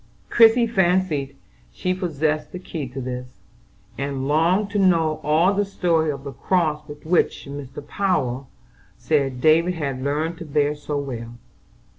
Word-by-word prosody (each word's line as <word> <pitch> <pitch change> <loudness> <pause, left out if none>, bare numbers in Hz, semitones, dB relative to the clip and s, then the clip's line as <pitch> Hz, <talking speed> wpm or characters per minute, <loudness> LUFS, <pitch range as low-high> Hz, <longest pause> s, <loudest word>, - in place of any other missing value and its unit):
Christie 235 +1 +6
fancied 180 -9 +1 0.4
she 185 - -1
possessed 155 -4 -1
the - - -6
key 165 -5 -5
to 130 +2 -7
this, 125 0 -5 0.7
and 140 -1 -2
longed 175 +7 +2
to 205 - 0
know 165 -5 +2
all 165 +6 +3
the 205 +1 +1
story 170 -5 +1
of 140 -2 -4
the 140 - -6
cross 155 -2 0 0.2
which 170 +3 +1
Mr. 140 0 -8
Power 140 -10 -1 0.5
said 135 -5 0
David 165 +4 +4
had 140 -5 -3
learned 155 +4 -1
to 170 - -7
bear 145 -1 +1
so 150 0 -4
well. 120 -4 -5
155 Hz, 145 wpm, -23 LUFS, 140-180 Hz, 0.7 s, Christie